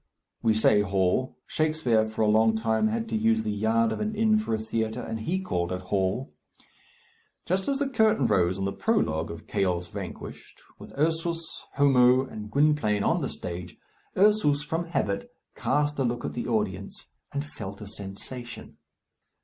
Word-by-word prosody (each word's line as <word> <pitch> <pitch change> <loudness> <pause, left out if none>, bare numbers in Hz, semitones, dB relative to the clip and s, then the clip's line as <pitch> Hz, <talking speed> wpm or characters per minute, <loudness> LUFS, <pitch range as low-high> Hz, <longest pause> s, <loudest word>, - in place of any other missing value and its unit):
We 110 -2 +3
say 105 -1 +5
hall. 95 +5 0
Shakespeare 155 -9 +1
for 110 0 -1
a - - +3
long 110 +1 +4
time 110 -1 +1
had 115 +1 -2
to 115 - -1
use 110 0 +2
the 110 - -1
yard 110 +2 +2
of - - -3
an 215 0 -2
inn 215 0 +3
for 215 - -4
a - - -1
theatre, 110 +1 -2
and 110 -2 -4
he 175 +12 -1
called 90 - -2
it 90 0 -3
hall. 95 +8 -1 1.1
Just 190 +2 0
as 275 - +1
the 285 0 0
curtain 220 - +3
rose 90 -3 +2
on 95 - -2
the 100 - -1
prologue 80 - 0
of 85 -1 -8
"Chaos 90 -4 -1
Vanquished," - - -8 0.2
with - - -11
Ursus, 165 +2 0 0.3
Homo, 130 -2 +5
and 105 -5 -8
Gwynplaine 140 -7 +2
on - - +2
the - - -2
stage, 90 0 -6 0.4
Ursus, 185 -8 +4
from 165 +3 -2
habit, 105 -12 -2 0.2
cast 150 0 0
a - - +3
look 120 -1 -1
at - - -4
the 120 - -4
audience, 105 -4 -2 0.2
and 140 +1 -3
felt 100 -8 -8
a 105 - -8
sensation. 105 +5 -8
115 Hz, 175 wpm, -27 LUFS, 105-150 Hz, 1.1 s, say